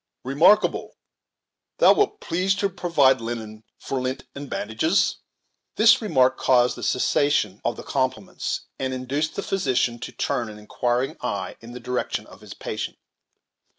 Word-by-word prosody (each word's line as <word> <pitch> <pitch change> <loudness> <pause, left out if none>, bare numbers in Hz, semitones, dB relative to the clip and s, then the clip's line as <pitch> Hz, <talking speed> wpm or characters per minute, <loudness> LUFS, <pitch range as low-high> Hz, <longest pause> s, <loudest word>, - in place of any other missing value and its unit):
Remarkable, 150 +11 +3 0.8
thou - - +7
wilt 420 0 +1
please 185 +3 0
to 200 0 0
provide 140 -9 +3
linen 110 -2 -6
for 135 -1 -3
lint 130 +1 -3
and 140 -1 -8
bandages." 115 - +1 0.6
This 235 +4 +6
remark 130 - +2
caused 125 -1 +3
a - - -8
cessation 125 -6 +1
of 120 - 0
the - - -8
compliments, 130 -7 -2 0.2
and 130 -1 -2
induced 140 +5 -2
the 200 - -3
physician 130 -9 0
to - - -6
turn 120 -2 -2
an 105 - -10
inquiring 120 +4 -1
eye - - -3
in 115 +1 -11
the 125 - -7
direction 125 +1 -3
of - - -16
his - - -10
patient. - - -5
130 Hz, 150 wpm, -24 LUFS, 120-160 Hz, 0.8 s, thou